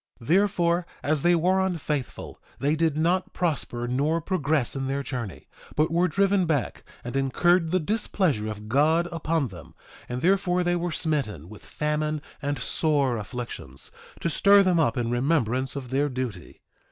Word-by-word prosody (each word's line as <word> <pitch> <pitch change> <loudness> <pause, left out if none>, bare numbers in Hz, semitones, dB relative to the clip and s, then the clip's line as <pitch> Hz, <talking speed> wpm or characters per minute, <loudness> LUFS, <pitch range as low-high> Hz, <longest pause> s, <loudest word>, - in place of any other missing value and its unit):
1:17 115 - -13
Therefore, 175 -2 +3 0.2
as 150 -1 +1
they 175 +3 +4
were 180 +3 +2
unfaithful 155 -7 -3 0.2
they 145 +3 +1
did 160 -2 +1
not 175 +4 +1
prosper 135 -8 -2
nor 145 +7 +1
progress 150 -6 0
in 135 -1 -2
their 140 +1 -1
journey, 120 - -6 0.3
but 155 +2 +2
were 175 +2 +3
driven 195 +1 +2
back, 145 -5 -1 0.2
and 120 +2 -6
incurred 165 +6 +2
the 185 +2 +2
displeasure 170 - 0
of 105 0 -7
God 155 +8 +3
upon 165 -4 -1
them; 90 -5 -12 0.3
and 125 +1 -3
therefore 180 0 +2
they 175 0 +1
were 175 0 -2
smitten 135 - -2
with 105 -3 -12
famine 150 0 -1 0.2
and 145 0 -1
sore 140 -7 +1
afflictions, 105 - -6 0.3
to - - 0
stir 200 +4 +5
them 180 -3 +3
up 125 -8 +2
in 120 -1 -1
remembrance 130 -1 0
of 130 -3 -6
their 145 +2 +1
duty. 125 - -6
150 Hz, 165 wpm, -26 LUFS, 125-175 Hz, 0.3 s, stir